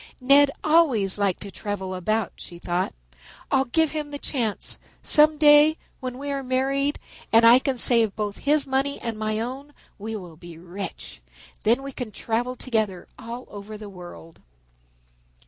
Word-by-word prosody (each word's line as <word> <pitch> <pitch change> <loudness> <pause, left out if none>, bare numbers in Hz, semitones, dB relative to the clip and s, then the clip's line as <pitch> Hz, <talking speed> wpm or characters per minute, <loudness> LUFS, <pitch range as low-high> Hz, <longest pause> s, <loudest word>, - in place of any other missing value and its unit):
"Ned 280 +2 +5
always 260 - +3
liked 200 -3 0
to 200 - -8
travel 190 0 -5
about," 210 +3 -1
she 175 - -11
thought. 175 +1 -2 0.6
"I'll 270 0 +3
give 320 +5 +1
him 300 -1 -4
the 290 - -6
chance. 235 -7 -1 0.2
Some 305 0 +6
day 295 +1 +6 0.2
when 255 -2 -6
we 285 +1 -5
are 275 -1 -2
married 270 +2 0 0.3
and 225 +1 +6
I 235 +2 +8
can 265 -1 -2
save 230 -4 +3
both 210 -2 -4
his 295 +1 +2
money 270 +1 -1
and 230 -1 -4
my 215 0 -2
own, 270 +5 -6 0.2
we 220 +2 -5
will 175 -6 -9
be 175 -1 -12
rich. 180 +4 -8 0.4
Then 235 +5 +2
we 275 - -6
can 250 -4 -6
travel 240 +4 -2
together 220 -8 -2
all 235 +2 -8
over 210 +1 -9
the 210 -1 -9
world." 175 -3 -12
235 Hz, 165 wpm, -24 LUFS, 205-275 Hz, 0.6 s, I